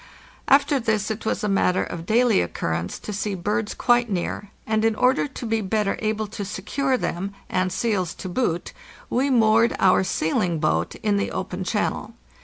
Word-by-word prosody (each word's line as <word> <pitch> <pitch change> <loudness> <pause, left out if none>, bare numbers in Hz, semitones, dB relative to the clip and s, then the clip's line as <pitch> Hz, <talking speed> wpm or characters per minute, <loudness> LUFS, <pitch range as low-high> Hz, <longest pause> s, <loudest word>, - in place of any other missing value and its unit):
After 280 0 +4
this 220 -3 0
it 220 0 -5
was - - -1
a - - +1
matter 195 -2 +2
of 170 0 -7
daily 235 - +4
occurrence 85 0 -3
to 210 - -7
see 205 0 -2
birds 210 +4 -2
quite 240 -1 +2
near, 195 +1 -3 0.2
and 220 0 0
in 225 -1 +2
order 255 +5 +2
to 265 -3 -8
be 225 -1 0
better 205 0 0
able 215 0 -1
to 210 0 -6
secure 255 +8 -1
them, 195 -2 -3 0.2
and 185 0 +1
seals 190 -7 -1
to - - -7
boot, 175 -3 -1 0.4
we 265 +4 +1
moored 230 -2 +4
our 190 0 +4
sealing 170 -1 0
boat 80 - 0
in 210 -2 +2
the 200 - -1
open 185 0 -4
channel. 210 +3 -2
210 Hz, 180 wpm, -23 LUFS, 185-225 Hz, 0.4 s, After